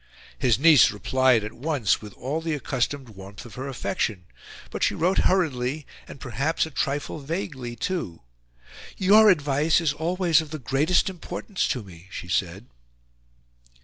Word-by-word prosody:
His 125 -4 +3
niece 150 -3 +7
replied 125 +2 +2
at 110 - -6
once 135 - 0
with 105 -2 -10
all 145 +6 -4
the 165 -1 -2
accustomed 135 -1 -2
warmth 100 +1 -11
of 120 - -12
her 130 +5 -6
affection; 110 -7 -3 0.5
but - - -5
she - - +2
wrote 180 +4 +1
hurriedly 150 -6 0 0.2
and, - - -11
perhaps, 135 +8 -1
a 160 - -9
trifle 145 +3 -2
vaguely 140 -6 -5
too. 115 - -4 0.7
"YOUR 210 +3 +6
advice 150 -2 +3
is 160 -4 0
always 170 +1 +1
of 155 - -9
the 155 - -5
GREATEST 140 - +1
IMPORTANCE 190 +2 -3
to 125 -6 -2
me," 90 -2 -14
she 90 - -7
said. 90 +4 -2
140 Hz, 150 wpm, -25 LUFS, 120-160 Hz, 0.7 s, niece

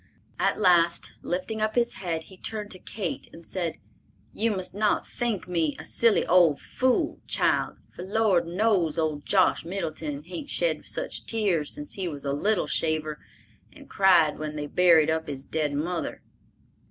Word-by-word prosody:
At - - +1
last, 175 -3 +3
lifting 200 +5 -3
up 215 0 0
his 240 -4 +1
head, 165 -3 -2
he 190 - -14
turned 210 +2 -4
to 185 - -3
Kate 205 +2 -5
and 165 0 -13
said, 175 -4 -3 0.6
"You 230 +2 +1
must 185 -4 -3
not 210 +1 +1
think 230 -7 -2
me 165 -4 0
a 160 - -9
silly 230 +5 +3
old 170 -5 +4
fool, 255 -1 0
child, - - +1 0.2
for - - -9
Lord 190 -3 +2
knows 180 -3 +2
old 155 -3 -1
Josh 190 -2 +3
Middleton 160 -5 -4
hain't 180 - -7
shed - - 0
such - - -5
tears 195 -9 +1
since 295 0 -5
he 190 -2 -3
was 145 -4 -6
a 140 - 0
little 200 +7 +1
shaver 155 -1 -1 0.5
and - - -15
cried 175 -6 +4
when 155 0 -4
they 150 -1 -3
buried 160 -1 +5
up 160 0 -1
his 140 -2 -6
dead 155 -2 -1
mother." 165 +3 -3
175 Hz, 165 wpm, -26 LUFS, 155-205 Hz, 0.6 s, buried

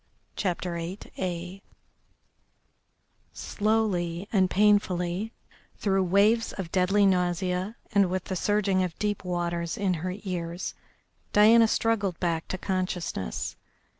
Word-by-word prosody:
CHAPTER 180 -2 -2
VIII 180 +1 -5 1.7
Slowly 200 -5 -1
and 190 -3 +4
painfully, 195 0 +2 0.5
through 195 -2 +1
waves 210 +5 +3
of 180 -4 -6
deadly 195 +2 +3
nausea 180 +2 0 0.2
and 200 -2 +3
with 185 0 -2
the 190 - -4
surging 200 0 +1
of 180 -3 -2
deep 210 -2 -2
waters 170 -2 -2
in 195 -3 +1
her 185 +1 -3
ears, 175 -2 -4 0.6
Diana 225 +2 +7
struggled 205 -6 0
back 165 -2 -1
to 185 - -3
consciousness. 180 - -3
185 Hz, 105 wpm, -27 LUFS, 175-205 Hz, 1.7 s, Diana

